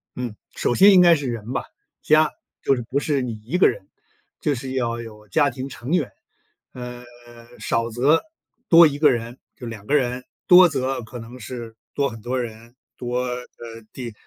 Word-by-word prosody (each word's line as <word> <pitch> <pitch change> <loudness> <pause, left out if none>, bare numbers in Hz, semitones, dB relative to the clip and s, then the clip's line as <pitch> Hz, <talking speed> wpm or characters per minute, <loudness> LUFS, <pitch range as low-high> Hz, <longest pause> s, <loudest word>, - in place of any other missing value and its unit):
嗯， 120 -4 -5 0.2
首 - - 0
先 200 +2 +8
应 185 - +7
该 175 -1 +7
是 145 -3 -4
人 115 -1 -5
吧， - - -2 0.4
家， 155 0 +4 0.3
就 135 - +3
是 125 - -4
不 125 +4 -2
是 145 -2 0
你 125 -2 -3
1 130 +11 -2
个 185 - +6
人， - - -7 0.5
就 145 -2 +1
是 130 +1 -6
要 120 -3 -1
有 105 -2 -11
家 145 +5 +2
庭 130 +1 -6
成 125 +1 -7
员， 160 - +1 0.6
呃， 125 -1 -8 0.5
少 115 0 -1
则 135 +8 +3 0.5
多 170 -1 +9
1 145 -1 -4
个 145 -1 +5
人 120 0 -4 0.2
就 125 - -9
2 110 -3 -8
个 140 - -2
人， 125 -2 0 0.2
多 180 0 +9
则 135 -4 -2
可 120 +3 -9
能 120 +2 -10
是 115 0 -8 0.2
多 140 -1 0
很 110 -1 -10
多 125 +3 -2
人， 115 +1 -9 0.2
多， 125 0 -2
呃， 125 0 -3 0.6
第 120 -3 -7
125 Hz, 190 characters per minute, -22 LUFS, 115-145 Hz, 0.6 s, 多